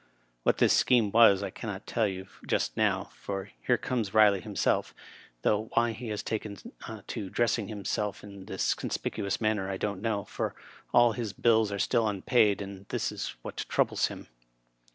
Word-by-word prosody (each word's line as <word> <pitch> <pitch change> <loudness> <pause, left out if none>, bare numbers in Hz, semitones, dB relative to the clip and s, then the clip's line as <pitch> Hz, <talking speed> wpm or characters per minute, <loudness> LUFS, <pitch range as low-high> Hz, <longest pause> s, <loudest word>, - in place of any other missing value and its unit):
What - - +2
this - - +4
scheme 115 -5 +4
was 100 -3 +6
I 100 - -3
can 115 - -6
not 95 0 -6
tell 110 -2 +1
you 95 -1 -5 0.2
just - - 0
now, - - +1
for 100 0 -5 0.2
here 125 - +4
comes 115 -3 -2
Kiley 105 -2 +5
himseM, - - 0 0.5
though 110 +1 +1
why 115 0 +3
he 115 +2 -7
has 105 -2 -3
taken 105 -2 -4 0.5
to 105 -5 -5
dressing 115 -2 +1
him 105 -2 -7
seK 105 -1 -2
in 100 -2 -10
this 95 -2 0
conspicuous 100 -1 -3
manner 110 -3 0
I 95 - -2
don't 100 -2 -3
know, 105 -3 -1
for - - -3 0.4
all 120 -1 +6
his 110 -3 -4
bills 110 0 +3
are 100 - -2
still 115 +3 +2
unpaid, 105 0 +2
and 100 0 -10
this - - -1
is - - -5
what - - -7
troubles - - +2
him. - - -9
105 Hz, 180 wpm, -29 LUFS, 100-115 Hz, 0.5 s, was